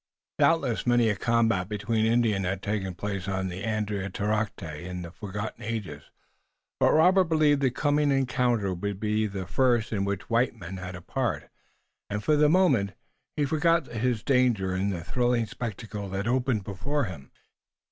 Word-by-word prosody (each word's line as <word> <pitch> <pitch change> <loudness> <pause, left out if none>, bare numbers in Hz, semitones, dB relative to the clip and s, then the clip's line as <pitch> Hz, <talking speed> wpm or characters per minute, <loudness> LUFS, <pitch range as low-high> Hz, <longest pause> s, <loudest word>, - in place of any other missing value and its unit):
Doubtless 140 -9 +2
many 120 -2 +4
a 105 - +1
combat 115 -4 +1
between 110 +1 0
Indians 115 -4 +2
had 95 +1 -2
taken 100 -3 -2
place 100 0 -4
on 95 -1 -2
Andiatarocte 105 +1 -2 0.2
in 90 0 -6
the 85 - -8
forgotten 105 +3 -6
ages, 100 -10 -5 0.7
but - - +4
Robert 185 +4 +5
believed 155 -3 +3
the 135 - +3
coming 145 +3 +1
encounter 125 -7 +1
would 100 +2 -4
be 110 0 0
the 95 -2 -5
first 120 +2 +1
in 100 -2 0
which 100 -2 -3
white 120 +1 +1
men 95 -3 -8
had 90 0 -6
a 90 - -10
part, - - -2 0.6
and, 105 +1 -3
for 155 - +3
the 150 0 +4
moment, 140 - +3 0.4
he 145 - +2
forgot 160 +2 +2
his 120 -1 -1
danger 120 -8 +2
in 95 +2 0
the 90 -4 -3
thrilling 120 +3 +1
spectacle 105 -3 -6
that 95 +3 -3
opened 125 -3 +1
before 130 +10 -2
him. 85 - -7
110 Hz, 160 wpm, -27 LUFS, 95-125 Hz, 0.7 s, Robert